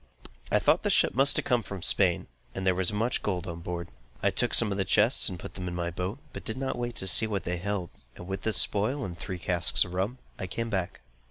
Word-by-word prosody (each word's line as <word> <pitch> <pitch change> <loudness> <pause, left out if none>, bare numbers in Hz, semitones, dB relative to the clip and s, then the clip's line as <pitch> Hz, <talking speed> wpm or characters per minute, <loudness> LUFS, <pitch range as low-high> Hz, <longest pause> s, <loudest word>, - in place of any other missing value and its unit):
I - - +5
thought - - +3
the - - -1
ship - - +3
must 135 +3 +3
have - - 0
come 125 -1 +2
from 100 -4 -7
Spain, 90 -4 +2 0.3
and 95 - -4
there 95 - +4
was 90 +1 0
much 110 +4 0
gold 90 -4 -2
on 85 -2 -6
board. 85 0 -5 0.4
I - - +3
took - - +3
some 115 -3 +5
of 100 - -2
the - - +2
chests 105 +6 +3
and 90 - -6
put - - -9
them 90 -1 -6
in 90 - -4
my 85 0 -2
boat, 90 +7 -4 0.2
but - - -8
did 110 - -4
not 135 0 -2
wait 120 -1 -4
to - - -3
see 105 +4 +6
what 100 -3 -2
they 90 0 -2
held, 95 -1 -3 0.2
and 90 - -10
with 95 0 -4
this 110 -4 +3
spoil, 110 +10 +1
and 90 -2 -6
three 95 +2 -6
casks 90 0 +2
of 90 - -9
rum, 100 +7 -2 0.2
I 95 - -3
came 115 +5 -4
back. 95 -4 -3
95 Hz, 260 wpm, -28 LUFS, 90-110 Hz, 0.4 s, see